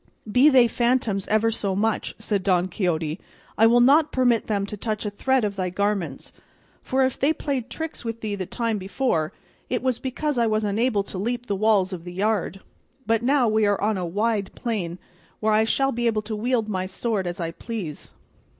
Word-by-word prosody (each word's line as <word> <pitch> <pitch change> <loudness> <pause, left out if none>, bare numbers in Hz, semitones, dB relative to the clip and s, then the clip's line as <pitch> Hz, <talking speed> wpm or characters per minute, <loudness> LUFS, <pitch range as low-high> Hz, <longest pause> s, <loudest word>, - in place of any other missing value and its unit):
"Be 255 +7 +6
they 255 -4 +6
phantoms 235 -4 0
ever 220 +1 +2
so 200 -3 -2
much," 220 +2 -1
said 205 -3 -1
Don 185 -1 +2
Quixote, 165 -3 -1 0.4
"I 225 - +5
will 240 +1 +5
not 290 +5 +5
permit 245 -3 +2
them 200 -2 0
to 205 - -6
touch 215 +1 -3
a 210 - -2
thread 260 +3 +1
of 200 -1 -3
thy 185 -2 -1
garments; 190 -6 -2 0.5
for 265 0 +1
if 260 - -2
they 280 +3 +3
played 275 -6 -3
tricks 320 -4 -6
with 230 -1 -5
thee 215 -2 -3
the 190 -3 -4
time 230 -3 -2
before, 190 -5 -1 0.4
it 250 - -1
was 255 -3 0
because 270 +1 -2
I 230 - +3
was 215 0 +1
unable 210 +1 +1
to 190 - -7
leap 240 +4 -2
the 205 - -1
walls 200 -2 +2
of 170 -2 -6
the 175 0 -8
yard; 195 -1 -1 0.4
but 225 0 +2
now 260 0 +3
we 215 -1 +3
are 205 -1 +1
on 215 +1 +1
a 185 - -3
wide 205 +3 0
plain, 190 -8 -3 0.4
where 215 0 +2
I 220 +1 +4
shall 270 +4 +1
be 240 -1 -1
able 215 -2 0
to 215 0 -4
wield 230 +1 0
my 185 -3 -2
sword 195 0 -2
as 175 +1 -5
I 165 -1 -2
please." 180 -5 -6
215 Hz, 205 wpm, -24 LUFS, 195-240 Hz, 0.5 s, Be